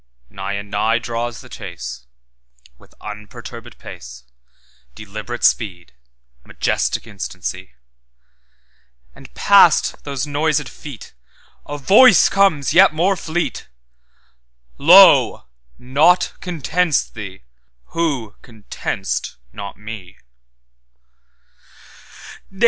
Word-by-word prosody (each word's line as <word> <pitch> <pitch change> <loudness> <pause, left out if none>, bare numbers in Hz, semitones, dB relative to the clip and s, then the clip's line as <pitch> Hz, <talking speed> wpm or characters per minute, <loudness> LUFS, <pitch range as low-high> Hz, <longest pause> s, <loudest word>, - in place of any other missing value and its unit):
Nigh 95 +1 -5
and 100 0 -6
nigh 110 +3 +1
draws 120 0 -4
the - - -14
chase, - - -9 0.7
With - - -22
unperturbèd 105 0 -10
pace, 65 +1 -11 0.7
Deliberate 110 +3 -7
speed, 90 - 0 0.5
majestic - - -2
instancy; 95 -4 -7 1.4
And - - -15
past - - +4
those 140 -1 -4
noisèd 150 +1 0
FeetA 140 -7 -11 0.7
voice 215 - +6
comes 185 -9 +2
yet 185 -2 +6
more 185 +5 +2
fleet—'Lo! 65 - +1 0.3
naught 150 +8 +2
contents 170 -1 0
thee, 100 -4 -10 0.5
who 135 -11 -2
content'st 110 -4 -5 0.2
not 100 -1 -8
Me! 105 -3 -10
115 Hz, 80 wpm, -19 LUFS, 95-155 Hz, 1.4 s, voice